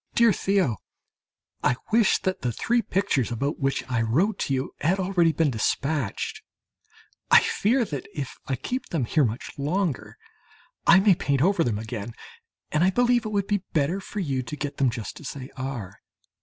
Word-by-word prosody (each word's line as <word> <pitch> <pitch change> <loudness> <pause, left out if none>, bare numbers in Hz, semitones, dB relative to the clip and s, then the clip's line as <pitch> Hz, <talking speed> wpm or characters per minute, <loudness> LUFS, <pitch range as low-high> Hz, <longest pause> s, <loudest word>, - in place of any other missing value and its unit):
DEAR 235 -3 +5
THEO, 185 - +1 0.9
I 125 - +3 0.2
wish 225 -2 +4
that 190 0 -1
the 125 - 0
three 235 - +1
pictures, 185 - 0
about 140 +6 -2
which 135 -1 0
I 125 -3 0
wrote 165 - +1
to 140 - -1
you, 130 +1 -3
had 180 +6 +2
already 180 -3 +3
been 160 -2 +1
despatched. 135 +1 -1 0.9
I - - +9
fear 240 +4 +1
that 145 -9 -5
if 140 -7 -5
I 135 - 0
keep 250 - -4
them 155 -8 -1
here 145 +4 +2
much 115 +2 -4
longer, 160 +1 -1 0.7
I 190 - +8
may 200 0 +5
paint 140 -5 0
them 175 - +5
over 195 -4 +1
again, 110 -2 -3 0.6
and 155 +2 +2
I 185 - +5
believe 245 +3 +2
it - - -5
would 200 -2 0
be 205 -1 0
better 160 +5 +1
for 205 - -6
you 135 -7 -1
to 125 +4 -6
get 145 -1 -4
them 135 -2 +3
just 115 -2 -6
as 145 - -6
they 135 -1 -9
are. 120 -8 -6
150 Hz, 185 wpm, -25 LUFS, 130-195 Hz, 0.9 s, I